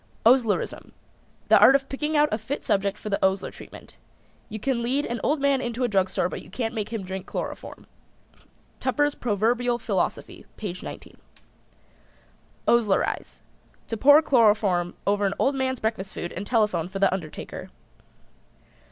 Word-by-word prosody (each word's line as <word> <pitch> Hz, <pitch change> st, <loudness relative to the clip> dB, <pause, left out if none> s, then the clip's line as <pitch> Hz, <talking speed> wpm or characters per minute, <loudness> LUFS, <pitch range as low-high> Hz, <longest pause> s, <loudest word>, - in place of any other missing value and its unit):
OSLERISM. 235 Hz, -3 st, +2 dB, 0.6 s
The -, -, +7 dB
art 270 Hz, -, +8 dB
of 275 Hz, -1 st, +1 dB
picking 300 Hz, +3 st, -2 dB
out 295 Hz, 0 st, +5 dB
a 215 Hz, -, -1 dB
fit 250 Hz, +7 st, -5 dB
subject 200 Hz, 0 st, 0 dB
for 215 Hz, -, -7 dB
the 200 Hz, -, -1 dB
Osler 190 Hz, 0 st, +1 dB
treatment. -, -, -13 dB, 0.5 s
"You 215 Hz, -, -6 dB
can 250 Hz, +1 st, -1 dB
lead 265 Hz, +5 st, 0 dB
an 235 Hz, 0 st, -4 dB
old 300 Hz, +1 st, +1 dB
man 275 Hz, -1 st, +2 dB
into 240 Hz, 0 st, -3 dB
a -, -, +3 dB
drugstore 190 Hz, -4 st, +1 dB
but -, -, -6 dB
you -, -, -15 dB
can't 225 Hz, +3 st, -3 dB
make 215 Hz, -3 st, -3 dB
him 225 Hz, -3 st, -4 dB
drink 190 Hz, 0 st, -6 dB
chloroform." -, -, -6 dB, 0.9 s
(Tupper's 290 Hz, +3 st, +1 dB
Proverbial 240 Hz, +2 st, 0 dB
Philosophy, 230 Hz, -, -3 dB
page 185 Hz, -4 st, -5 dB
19.) -, -, -9 dB, 1.5 s
OSLERIZE. 225 Hz, -5 st, +1 dB, 0.5 s
To 225 Hz, -, -2 dB
pour 290 Hz, +7 st, +6 dB
chloroform 205 Hz, -9 st, +3 dB
over 200 Hz, 0 st, +2 dB
an 195 Hz, -, -2 dB
old 275 Hz, -, +2 dB
man's 260 Hz, -2 st, -1 dB
breakfast 220 Hz, -3 st, -3 dB
food 175 Hz, -, -5 dB
and 195 Hz, +3 st, -6 dB
telephone 210 Hz, -8 st, +1 dB
for 190 Hz, +2 st, -6 dB
the 195 Hz, -1 st, +3 dB
undertaker. 165 Hz, -5 st, -6 dB
225 Hz, 155 wpm, -25 LUFS, 195-260 Hz, 1.5 s, art